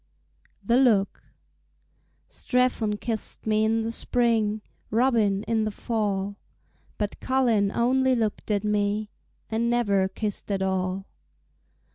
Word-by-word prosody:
The 235 Hz, +5 st, +3 dB
Look 220 Hz, -7 st, +3 dB, 1.1 s
Strephon 245 Hz, -4 st, 0 dB
kissed 225 Hz, -3 st, -3 dB
me 215 Hz, 0 st, +2 dB
in 225 Hz, +1 st, +2 dB
the 225 Hz, +1 st, -2 dB
spring, 225 Hz, -3 st, +1 dB, 0.3 s
Robin 220 Hz, -4 st, +2 dB
in 225 Hz, 0 st, 0 dB
the 215 Hz, -, 0 dB
fall, 205 Hz, -3 st, -2 dB, 0.6 s
But 210 Hz, -1 st, -3 dB
Colin 235 Hz, -7 st, +2 dB
only 260 Hz, +3 st, +2 dB
looked 220 Hz, -2 st, -2 dB
at 205 Hz, -1 st, +1 dB
me 210 Hz, 0 st, 0 dB, 0.4 s
And 230 Hz, +1 st, 0 dB
never 200 Hz, -6 st, +2 dB
kissed 205 Hz, +2 st, -4 dB
at 195 Hz, -1 st, 0 dB
all. 190 Hz, 0 st, -1 dB
215 Hz, 115 wpm, -26 LUFS, 200-235 Hz, 1.1 s, The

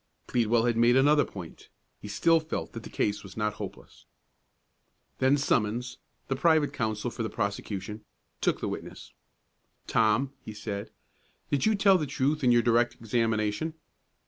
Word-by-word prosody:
Pleadwell 115 Hz, -1 st, +2 dB
had 120 Hz, -1 st, +1 dB
made 120 Hz, +1 st, +5 dB
another 145 Hz, +2 st, +5 dB
point. 90 Hz, -5 st, -10 dB, 0.3 s
He -, -, -9 dB
still 165 Hz, -1 st, +3 dB
felt 160 Hz, 0 st, -5 dB
that -, -, -6 dB
the -, -, -10 dB
case 105 Hz, 0 st, -1 dB
was 95 Hz, 0 st, -12 dB
not 105 Hz, -1 st, 0 dB
hopeless. -, -, -9 dB, 1.1 s
Then 135 Hz, +2 st, +4 dB
Summons, 120 Hz, -2 st, 0 dB, 0.3 s
the 135 Hz, -, 0 dB
private 155 Hz, +1 st, +3 dB
counsel 110 Hz, -1 st, -2 dB
for -, -, -6 dB
the 110 Hz, -, -1 dB
prosecution, 100 Hz, +1 st, -4 dB, 0.4 s
took -, -, +1 dB
the -, -, -1 dB
witness. -, -, -7 dB, 0.7 s
"Tom," 115 Hz, +5 st, +2 dB
he 110 Hz, -, -9 dB
said, 105 Hz, -1 st, -5 dB, 0.6 s
"did 145 Hz, +7 st, +2 dB
you 220 Hz, -, +3 dB
tell 195 Hz, -2 st, +5 dB
the 150 Hz, -, -2 dB
truth 145 Hz, +3 st, 0 dB
in 125 Hz, -, +5 dB
your 120 Hz, -1 st, +4 dB
direct 120 Hz, 0 st, +3 dB
examination?" 115 Hz, +5 st, -1 dB
120 Hz, 155 wpm, -28 LUFS, 105-140 Hz, 1.1 s, made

